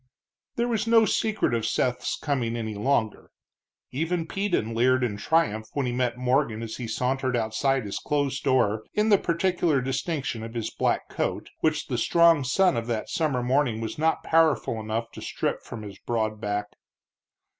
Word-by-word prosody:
There 235 +1 0
was 225 -2 -1
no 225 -1 +6
secret 215 - 0
of 115 -1 0
Seth's 125 +2 0
coming 120 -6 -1
any 110 -2 -3
longer. 110 0 -1 0.6
Even 165 +5 -1
Peden 175 - -1
leered 130 +2 +3
in 115 -4 -1
triumph 110 -3 +1
when 140 -2 -1
he 125 - -1
met 125 -1 -1
Morgan 125 -3 +1
as 110 -1 -6
he 120 - -5
sauntered 130 +2 -1
outside 120 +3 0
his 100 - -4
closed 145 -1 -1
door 110 -6 +2
in 210 +1 +2
the 200 -2 +6
peculiar 170 -3 +1
distinction 135 -1 -2
of 115 +1 -8
his 115 -2 -3
black - - 0
coat, - - -3
which 155 -1 +1
the 125 -4 -2
strong 170 +2 +4
sun 180 +8 +3
of 115 0 -3
that 115 -3 -2
summer 145 -7 0
morning 125 -3 +1
was 115 +5 -5
not 160 +1 +1
powerful 160 -8 +2
enough 110 +1 -3
to - - -10
strip - - -2
from 115 -2 -8
his 100 -2 -9
broad 110 -2 -2
back. 105 0 -2
130 Hz, 175 wpm, -26 LUFS, 115-160 Hz, 0.6 s, no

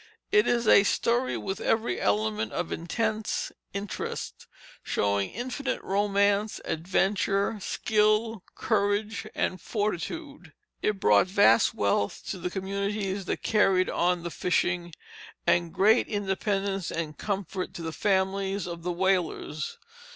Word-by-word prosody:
It 415 +1 +5
is 235 -2 +1
a 200 - +8
story 240 +4 +1
with 195 -1 -4
every 225 +1 0
element 110 +1 0
of 175 - -3
intense 220 +5 -2 0.2
interest, 200 0 -5 0.3
showing 100 -1 0
infinite 260 +3 -3
romance, 200 +1 +1
adventure, 195 +4 0
skill, 215 +2 +1
courage, 210 0 0
and 185 - -1
fortitude. 210 - -4 0.3
It 210 -2 0
brought 105 - +5
vast 185 - +4
wealth 100 0 0
to 190 - -5
the 180 +1 -2
communities 200 +1 -2
that - - -3
carried 195 -4 +3
on 175 0 +1
the 170 - -4
fishing, 175 -1 0 0.5
and 170 -1 +2
great 215 +7 +4
independence 195 -1 -1
and 155 -2 -4
comfort 195 0 -3
to 170 - -6
the 160 -1 -4
families 195 +1 0
of 170 -1 -6
the 180 +2 -2
whalers. 180 - -1
195 Hz, 120 wpm, -27 LUFS, 175-210 Hz, 0.5 s, a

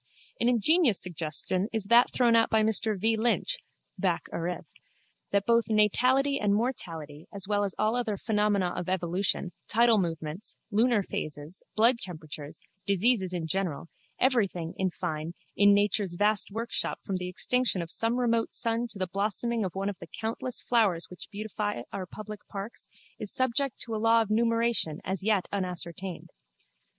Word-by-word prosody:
An 240 - +3
ingenious 250 - +4
suggestion 175 +3 +1
is 220 -2 0
that 235 +4 +5
thrown 240 -2 +3
out 225 0 +4
by 220 -1 +3
Mr 220 -1 +1
V. 225 +3 +2
Lynch 220 -3 +1 0.4
(Bacc. - - +1
Arith.) 175 +2 -3 0.6
that 200 0 +1
both 235 0 +3
natality 255 +6 +3
and 205 -1 +2
mortality, 165 - -3
as 200 -1 -5
well 205 -1 +1
as 195 -2 -2
all 215 +2 +1
other 230 -5 -1
phenomena 210 -4 +1
of 175 - -4
evolution, 185 0 0 0.2
tidal 230 -1 +4
movements, 165 +1 -4 0.2
lunar 225 0 +3
phases, 150 +1 -5
blood 235 +3 +5
temperatures, 155 -4 -7 0.3
diseases 200 -1 +2
in 175 -3 -3
general, 165 -2 -2 0.3
everything, 200 -10 +1
in 190 -1 0
fine, 165 -1 -4 0.2
in 205 0 +6
nature's 200 -2 +2
vast 205 +2 +2
workshop 225 +3 -2
from 195 -2 -1
the 180 0 -4
extinction 250 +3 +1
of 170 -1 -4
some 225 +1 0
remote 230 -2 +1
sun 230 +1 0
to 225 - -10
the 185 - 0
blossoming 210 +5 -1
of 185 -2 -4
one 195 +1 -2
of 205 -2 -4
the - - -9
countless 230 +2 -1
flowers 200 -9 +1
which 180 - -10
beautify 205 - -3
our 190 -2 -4
public 215 +2 -8
parks 200 +3 -8 0.3
is 210 - -3
subject 260 +1 0
to 230 - -5
a 215 - -2
law 225 +1 +5
of 215 - -7
numeration 230 -7 +1
as 190 +1 -1
yet 205 -3 +2
unascertained. 185 -1 -4
205 Hz, 160 wpm, -28 LUFS, 180-230 Hz, 0.6 s, in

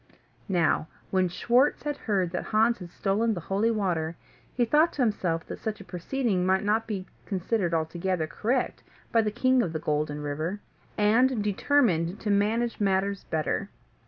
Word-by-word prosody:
Now 170 -3 +2 0.2
when 185 -1 +2
Schwartz 245 +9 +2
had 295 0 -2
heard 190 -8 -1
that 180 - -3
Hans 225 +2 +2
had 180 -2 -8
stolen 210 +5 0
the - - -3
holy 195 +6 0
water, 175 -7 -1 0.4
he 245 - +1
thought 305 +7 +3
to 270 - +1
himself 180 -7 0
that - - -7
such 215 -2 -4
a - - -9
proceeding 195 +2 -1
might 190 +2 +2
not 215 +2 +1
be 195 -4 -3 0.2
considered 190 -1 -1
altogether 165 +1 -1
correct 235 +10 -1 0.3
by 230 - +4
the 215 - 0
King 255 +3 +2
of 170 -7 -2
the 155 - -2
Golden 150 -1 -1
River, 155 +7 -3 0.4
and 225 +2 +3
determined 205 - +2
to 210 - 0
manage 220 +4 +1
matters 195 -1 0
better. 160 +5 -1
200 Hz, 165 wpm, -27 LUFS, 175-230 Hz, 0.4 s, by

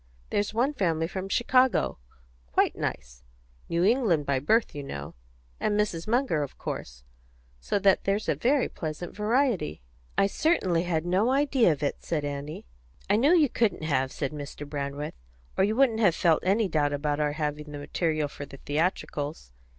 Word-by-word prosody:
There's 205 0 0
one 245 +7 +1
family 165 - 0
from 190 +2 -5
Chicago 240 - +2 0.5
quite 65 - +2
nice - - -5 0.5
New 170 +1 +1
England 200 - +3
by 140 -2 +1
birth, 220 - +2
you 145 - -5
know; 70 - -7 0.5
and 210 -1 +1
Mrs. 180 -5 -1
Munger, 235 - +1
of 140 - -5
course; - - -6 0.6
so 60 - -1
that 195 -1 +3
there's 200 +2 0
a - - +3
very 265 +2 +2
pleasant 160 +2 -6
variety." 210 - 0 0.3
"I 195 - +5
certainly 195 - +1
had 165 -2 -1
no 190 +7 +2
idea 270 - +3
of 150 -1 -3
it," 145 - -1
said 150 -3 -2
Annie. 145 +1 -5 0.5
"I - - +5
knew 285 +11 +5
you 305 -3 +5
couldn't 230 -9 0
have," 135 -4 0
said 140 -3 -3
Mr. 145 0 -7
Brandreth, 145 0 -4 0.4
"or - - +3
you 210 +3 +1
wouldn't 245 -4 +3
have 190 -7 +4
felt 165 -3 +3
any 200 +3 +2
doubt 150 -4 +1
about 145 +1 -1
our 150 -1 +1
having 150 0 -3
the 145 - -6
material 155 +1 -1
for 145 0 -8
the 140 - -11
theatricals. 145 - -2
170 Hz, 175 wpm, -27 LUFS, 145-215 Hz, 0.6 s, I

